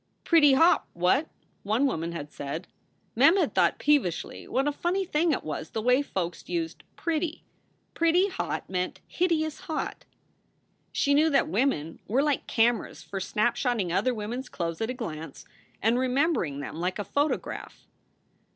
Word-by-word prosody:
"Pretty 300 -5 +6
hot, 325 +6 +4
what?" 185 - +2 0.3
one 220 +7 +1
woman 170 - -1
had 150 -3 -6
said. 145 +5 -5 0.5
Mem 280 - +6
had - - +1
thought - - +3
peevishly 280 - 0
what 270 +2 0
a - - +2
funny 355 +6 -1
thing 330 0 +1
it 280 - -1
was 155 +1 -5
the 220 - -3
way 250 +3 +4
folks 180 -10 -4
used 165 -2 -3
"pretty" 325 0 -2 0.5
"pretty 335 +3 +3
hot" 375 - -3
meant 180 -1 -2
"hideous 315 -4 0
hot." 315 - -4 0.9
She 285 - +2
knew 305 +3 +4
that 275 -2 +3
women 180 - 0
were 255 +7 +2
like 295 -2 0
cameras 230 0 +1
for 195 - -5
snapshotting 215 -1 0
other 250 +7 +1
women 220 +3 -4
s 265 - -8
clothes 165 0 -4
at 225 - -1
a 255 - -3
glance 160 - -7 0.4
and 230 +3 +3
remembering 255 - +1
them 150 - -6
like 180 +2 -2
a 205 - -2
photograph. 290 +1 -2
250 Hz, 160 wpm, -27 LUFS, 180-300 Hz, 0.9 s, Pretty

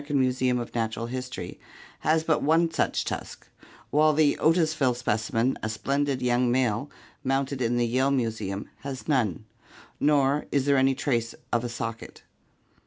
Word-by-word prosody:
Americun 145 -1 -1
Museum 130 -1 +2
of 120 -1 -5
Natural 115 0 -2
History, 125 -7 -6 0.4
has 160 +1 +1
one 160 +1 +3
such - - 0
tusk, - - -6 0.5
while 155 +1 +4
the 150 -1 +3
Otisville 155 -6 +3
specimen, 115 +1 0
a 110 - -2
splendid 140 +3 -1
young 125 0 +2
male 125 +1 +1 0.3
mounted 135 0 -1
in 120 0 +1
the 120 - +2
Yale 130 +4 +2
Museum, 110 -7 -2
has 135 -2 -7
none, 115 - 0 0.5
nor 145 -1 +2
is 140 -2 +1
there 140 -1 +4
any 135 0 +3
trace 120 -5 -1 0.2
of 120 0 +2
a 120 - -3
socket. 115 -1 -6
130 Hz, 150 wpm, -26 LUFS, 115-140 Hz, 0.5 s, while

